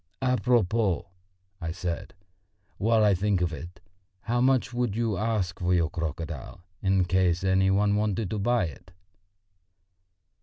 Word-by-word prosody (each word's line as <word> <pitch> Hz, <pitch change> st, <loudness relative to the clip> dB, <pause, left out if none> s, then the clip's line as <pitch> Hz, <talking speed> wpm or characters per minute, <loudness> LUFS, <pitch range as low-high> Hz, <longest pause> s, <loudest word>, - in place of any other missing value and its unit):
"À 125 Hz, -1 st, +1 dB
propos," 115 Hz, -5 st, +2 dB, 0.6 s
I 80 Hz, -1 st, -3 dB
said, 90 Hz, +1 st, -5 dB, 0.6 s
"while 110 Hz, +1 st, +3 dB
I 105 Hz, -1 st, +5 dB
think 100 Hz, +1 st, +1 dB
of 85 Hz, -2 st, -1 dB
it: 85 Hz, +4 st, -9 dB, 0.4 s
how 120 Hz, +1 st, 0 dB
much 130 Hz, 0 st, +2 dB
would 120 Hz, -4 st, -1 dB
you 115 Hz, -3 st, 0 dB
ask 105 Hz, -4 st, -1 dB
for 90 Hz, 0 st, +2 dB
your 85 Hz, -2 st, +1 dB
crocodile 85 Hz, +1 st, -5 dB, 0.2 s
in 95 Hz, -1 st, +2 dB
case 90 Hz, -1 st, +1 dB
any 95 Hz, 0 st, +3 dB
one 100 Hz, +1 st, +3 dB
wanted 105 Hz, -2 st, -1 dB
to 105 Hz, -, -2 dB
buy 120 Hz, 0 st, +2 dB
it?" 80 Hz, +3 st, -10 dB
95 Hz, 145 wpm, -27 LUFS, 90-110 Hz, 0.6 s, I